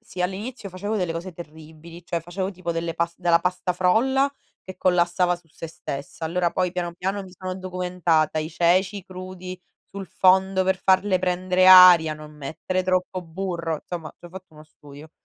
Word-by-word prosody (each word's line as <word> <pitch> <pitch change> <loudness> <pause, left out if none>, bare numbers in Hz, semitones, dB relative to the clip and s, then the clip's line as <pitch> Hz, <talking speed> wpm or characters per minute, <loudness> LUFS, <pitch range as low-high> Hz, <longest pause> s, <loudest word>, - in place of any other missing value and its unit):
Sì, 185 -5 -10
all'inizio 205 +5 -4
facevo 200 +4 -4
delle 180 -4 -1
cose 170 +3 -6
terribili, 160 +1 -12
cioè 170 -1 -3
facevo 185 +3 -4
tipo 175 -2 -5
delle 165 0 -3
pas 170 0 -2
della 170 -2 +3
pasta 180 0 -1
frolla, 255 +10 +2 0.3
che 185 - -10
collassava 180 0 +2
su 175 -1 -16
sé 165 - -9
stessa; 140 -1 -7
allora, 170 +1 0
poi 180 -1 0
piano 175 -1 -4
piano 190 +3 -3
mi 185 - -14
sono 185 0 -5
documentata, 180 -4 0
i 155 0 -3
ceci 185 +4 +1
crudi 185 0 -9 0.3
sul 195 -1 -7
fondo 190 0 +3
per 190 0 +1
farle 190 +1 +2
prendere 185 0 +1
aria, 180 -4 +9
non 150 0 -11
mettere 155 +6 -4
troppo 185 0 -1
burro. 170 -1 -4
Insomma, 170 -3 -7
ci - - -23
ho - - -9
fatto 185 -2 -12
uno 155 - -13
studio. 150 0 -15
180 Hz, 175 wpm, -23 LUFS, 170-185 Hz, 0.3 s, aria